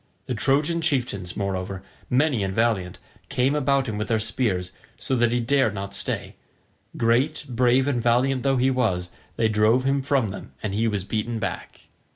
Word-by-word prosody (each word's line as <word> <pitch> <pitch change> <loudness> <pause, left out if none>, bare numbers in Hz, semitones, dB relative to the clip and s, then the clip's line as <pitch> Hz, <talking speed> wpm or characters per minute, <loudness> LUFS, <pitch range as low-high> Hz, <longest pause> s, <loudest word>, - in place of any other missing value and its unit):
The 130 - -3
Trojan 145 +8 +1
chieftains, 120 - -1
moreover, 95 -1 -3 0.3
many 130 -4 +2
and 95 0 -2
valiant, 110 -6 0 0.3
came 135 0 +1
about 140 -2 +1
him 105 -2 -3
with 110 - -2
their 115 - +2
spears, 100 -5 -1 0.3
so 125 +2 -2
that 120 -2 +2
he 120 - +1
dared 120 -2 +2
not 100 0 -5
stay; 100 - -3 0.6
great, 130 +7 +1
brave 125 +2 +2
and 125 -4 0
valiant 125 +3 +2
though 135 0 +2
he 130 +2 +3
was, 95 -9 0 0.2
they 115 - +2
drove 110 +4 +3
him 135 +1 +1
from 135 -5 +1
them 95 - -9
and 105 -3 -2
he 110 +3 +1
was 100 -4 -1
beaten 110 +3 -2
back. 105 -3 -5
120 Hz, 180 wpm, -24 LUFS, 105-135 Hz, 0.6 s, he